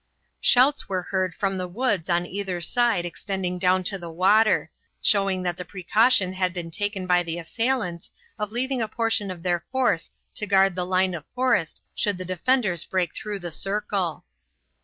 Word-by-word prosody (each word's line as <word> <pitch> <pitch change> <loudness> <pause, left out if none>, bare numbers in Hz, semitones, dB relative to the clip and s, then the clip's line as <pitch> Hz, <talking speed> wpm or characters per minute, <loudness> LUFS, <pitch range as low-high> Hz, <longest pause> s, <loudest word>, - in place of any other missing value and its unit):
Shouts 265 +1 +4
were 185 -2 -1
heard 185 -2 -1
from 195 -2 -1
the 180 - -3
woods 200 -3 -1
on 175 0 +2
either 190 -1 -3
side 225 0 +2
extending 180 0 -3
down 185 0 +3
to 195 +2 0
the 170 -1 -7
water, 200 +6 +3 0.3
showing 195 -2 +2
that 175 -1 -2
the 180 - -5
precaution 190 +2 +2
had 185 -1 -1
been 170 -2 -5
taken 205 +1 -2
by 180 -1 +3
the 170 -1 -4
assailants 190 -1 -2 0.3
of 210 0 -3
leaving 255 +2 -1
a 220 - 0
portion 225 -2 0
of 175 -2 -7
their 175 -2 0
force 255 -10 +1 0.2
to 210 - -2
guard 195 -1 +4
the 180 0 -2
line 185 0 +2
of 165 -3 -5
forest 250 -10 +1
should 205 -3 0
the 185 - -6
defenders 185 -1 +1
break 180 -3 -1
through 210 -1 -4
the 175 -1 -5
circle. 195 -1 -2
190 Hz, 180 wpm, -25 LUFS, 175-210 Hz, 0.3 s, Shouts